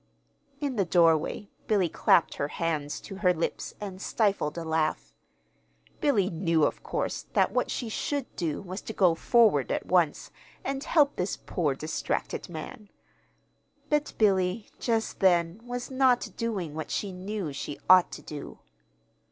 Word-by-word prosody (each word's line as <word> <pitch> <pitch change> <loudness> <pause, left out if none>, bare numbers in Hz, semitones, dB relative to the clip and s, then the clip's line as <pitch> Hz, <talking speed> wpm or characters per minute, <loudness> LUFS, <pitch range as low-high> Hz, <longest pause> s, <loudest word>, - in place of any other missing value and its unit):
In 280 -5 -2
the 200 - +3
doorway 165 +2 +2 0.2
Billy 200 -5 +3
clapped 170 - +3
her 140 - -1
hands 150 -2 -2
to 195 - -9
her 180 -3 +3
lips 165 - -3
and 195 -2 -7
stifled 200 -10 0
a 170 - -3
laugh. 160 -1 -1 0.9
Billy 215 -11 +2
knew, 165 -2 +1
of - - 0
course, - - -3
that - - +3
what - - 0
she 240 - -3
should 275 +4 -3
do 165 -2 -2
was 185 +1 -6
to 220 - -7
go 185 -5 +4
forward 205 - +3
at - - -1
once, 175 -5 +1 0.3
and 275 0 -3
help 295 -3 +3
this 180 +2 -1
poor, 150 -6 -1
distracted 155 +4 -3
man; 175 +5 -8 1.0
but 295 0 +1
Billy, 195 0 +2
just 225 -2 -1
then, 175 +1 +3
was 245 +1 -5
not 260 -2 +3
doing 200 -10 -3
what 155 0 -5
she 200 - -2
knew 185 -3 -4
she 140 +1 -6
ought 185 -1 +7
to - - -8
do. 150 -2 -8
185 Hz, 150 wpm, -28 LUFS, 165-220 Hz, 1.0 s, ought